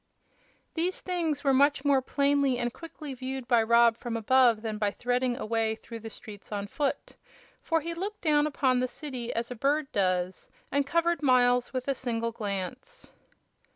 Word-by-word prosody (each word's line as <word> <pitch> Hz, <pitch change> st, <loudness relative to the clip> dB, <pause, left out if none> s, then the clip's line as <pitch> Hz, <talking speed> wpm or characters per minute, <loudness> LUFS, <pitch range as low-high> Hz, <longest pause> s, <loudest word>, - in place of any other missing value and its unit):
These 345 Hz, +3 st, -1 dB
things 330 Hz, -6 st, -2 dB
were 275 Hz, -2 st, +3 dB
much 280 Hz, +1 st, +3 dB
more 280 Hz, -2 st, +4 dB
plainly 280 Hz, -1 st, +2 dB
and 240 Hz, -1 st, -2 dB
quickly 310 Hz, -4 st, -8 dB
viewed 260 Hz, 0 st, -5 dB
by 240 Hz, -3 st, +4 dB
Rob 235 Hz, +1 st, +5 dB
from 235 Hz, -1 st, -4 dB
above 235 Hz, -1 st, +4 dB
than 215 Hz, -2 st, -3 dB
by 205 Hz, -1 st, +2 dB
threading 245 Hz, +3 st, -1 dB
a -, -, -4 dB
way 225 Hz, 0 st, 0 dB
through 230 Hz, +1 st, -9 dB
the 225 Hz, 0 st, -8 dB
streets 210 Hz, -2 st, -12 dB
on 205 Hz, -1 st, -3 dB
foot; 275 Hz, +7 st, -3 dB, 0.5 s
for 325 Hz, -1 st, 0 dB
he 335 Hz, +2 st, -4 dB
looked 400 Hz, +5 st, -5 dB
down 300 Hz, -2 st, +3 dB
upon 265 Hz, -4 st, +1 dB
the 255 Hz, -, +1 dB
city 255 Hz, -4 st, -5 dB
as 235 Hz, +1 st, -3 dB
a -, -, -4 dB
bird 280 Hz, +4 st, 0 dB
does, 185 Hz, -2 st, -1 dB, 0.2 s
and 280 Hz, 0 st, +1 dB
covered 335 Hz, +1 st, +1 dB
miles 250 Hz, -2 st, +3 dB
with 255 Hz, 0 st, -4 dB
a 275 Hz, -, +2 dB
single 230 Hz, -3 st, -2 dB
glance. 220 Hz, -, -6 dB
255 Hz, 180 wpm, -28 LUFS, 230-285 Hz, 0.5 s, Rob